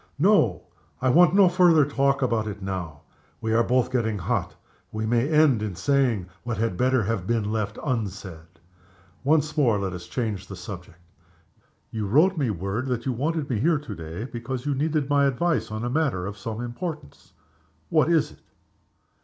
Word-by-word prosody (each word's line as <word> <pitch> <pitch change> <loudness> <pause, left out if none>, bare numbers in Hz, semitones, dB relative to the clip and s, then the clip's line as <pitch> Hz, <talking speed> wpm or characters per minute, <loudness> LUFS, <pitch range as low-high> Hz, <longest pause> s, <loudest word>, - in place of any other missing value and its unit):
No! 145 - +3 0.4
I 130 - +1
want 175 +4 +5
no 200 -2 +7
farther 175 -4 +5
talk 140 -1 +1
about 115 -3 0
it 100 -1 -6
now. 90 -6 -5 0.4
We 110 0 -1
are 115 +1 +4
both 125 +1 +1
getting 110 -4 0
hot 85 - -2 0.4
we 110 0 -3
may 120 +5 +1
end 150 -7 +4
in 105 -4 -3
saying 130 -6 +1 0.2
what 120 -1 -4
had 115 -4 -1
better 130 +2 +2
have 100 -3 -2
been 110 -3 0
left 105 -1 -2
unsaid. 95 - -4 0.6
Once 155 +2 +2
more, 125 -9 +3
let 95 -2 -3
us 90 -1 -8
change 110 -6 -3
the 95 - -7
subject. 90 -2 -9 0.9
You 110 -2 -3
wrote 160 - +4
me 140 -7 0
word 100 +6 -3
that 125 -2 -2
you 130 - 0
wanted 150 +4 -1
me 120 -5 -1
here 160 +6 +3
to 145 -1 -7
day, 80 +5 -7
because 125 +1 -5
you 145 - 0
needed 150 +1 0
my 140 0 +3
advice 165 +5 0
on 110 +1 -4
a - - -1
matter 135 - 0
of 100 +1 -5
some 110 +2 -5
importance. 120 - -7 0.6
What 155 0 +3
is 165 -3 +2
it?" - - -18
120 Hz, 180 wpm, -25 LUFS, 105-145 Hz, 0.9 s, no